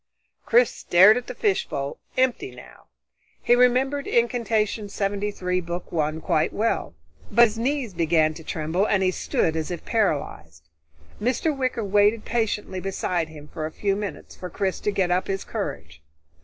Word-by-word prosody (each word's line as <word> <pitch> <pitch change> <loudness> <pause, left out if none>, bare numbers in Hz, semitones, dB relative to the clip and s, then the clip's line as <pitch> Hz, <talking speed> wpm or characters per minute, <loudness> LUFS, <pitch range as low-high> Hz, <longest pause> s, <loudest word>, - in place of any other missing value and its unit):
Chris 480 +1 +5
stared 190 +5 +6
at 245 - -4
the - - -6
fishbowl, 145 - -1 0.2
empty 260 +10 +1
now. - - -14 0.6
He - - +4
remembered 255 +3 +3
Incantation 225 -3 0
73, 195 -2 -2
Book 175 +1 -6
One, 155 -1 -1
quite 160 -3 +1
well, 220 - -1 0.3
but 235 - +6
his 225 0 -4
knees 260 -3 -1
began 160 -2 +2
to 160 - -11
tremble 160 +6 -1
and 195 -2 +2
he 185 - +3
stood 160 -2 0
as 160 -1 -2
if 175 -2 -6
paralyzed. 110 - -2 0.5
Mr. 260 +7 0
Wicker 255 -4 -1
waited 205 +2 +3
patiently 215 -5 -1
beside 180 -3 -2
him 150 -1 -12
for 155 0 -5
a - - -9
few 195 +4 -1
moments 205 -1 -6
for 180 - -7
Chris 190 -1 -2
to - - -1
get 190 -3 0
up 180 +1 +1
his 195 0 -2
courage. 80 - -6
195 Hz, 160 wpm, -24 LUFS, 170-230 Hz, 0.6 s, stared